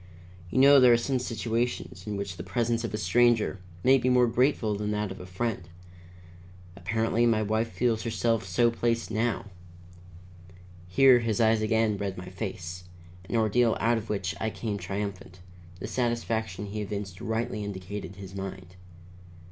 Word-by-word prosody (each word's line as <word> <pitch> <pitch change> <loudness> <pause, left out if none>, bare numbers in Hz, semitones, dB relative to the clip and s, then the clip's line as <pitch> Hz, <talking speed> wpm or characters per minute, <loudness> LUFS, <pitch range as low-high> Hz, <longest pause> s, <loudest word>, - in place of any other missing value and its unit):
You - - -3
know 140 +1 +8
there 125 -2 +7
are - - +5
some 130 +2 -1
situations 115 -4 -3
in 105 -1 -3
which 100 -3 -5
the - - -5
presence 115 -1 -1
of 115 - -3
a 105 - -2
stranger 115 -3 +2 0.2
may 135 +1 +6
be 130 - +1
more 125 -1 +5
grateful 120 -2 +1
than 105 +1 -3
that 105 -2 -1
of 95 - -8
a 90 - -9
friend. 95 -2 -3 1.1
Apparently, 110 +5 +1
my 110 -2 +2
wife 110 +2 0
feels 115 -3 0
herself 115 -1 0
so 115 +6 +2
placed 115 0 -1
now." 110 -2 -1 1.4
Here 130 +6 +6
his 115 -3 -1
eyes 110 -1 +4
again 110 -1 +1
read 100 -1 -4
my 90 0 -7
face, 90 -2 -6 0.4
an - - -2
ordeal 115 +1 +3
out 115 0 +2
of 110 - -11
which 100 -3 -2
I 110 - -1
came 105 -2 -4
triumphant; 95 -1 -5 0.4
the - - -5
satisfaction 110 -3 -2
he 105 +1 -5
evinced 100 -3 -5
rightly 110 -1 -2
indicated 95 -1 -6
his 95 -1 -10
mind. 95 -2 -7
110 Hz, 165 wpm, -28 LUFS, 100-115 Hz, 1.4 s, know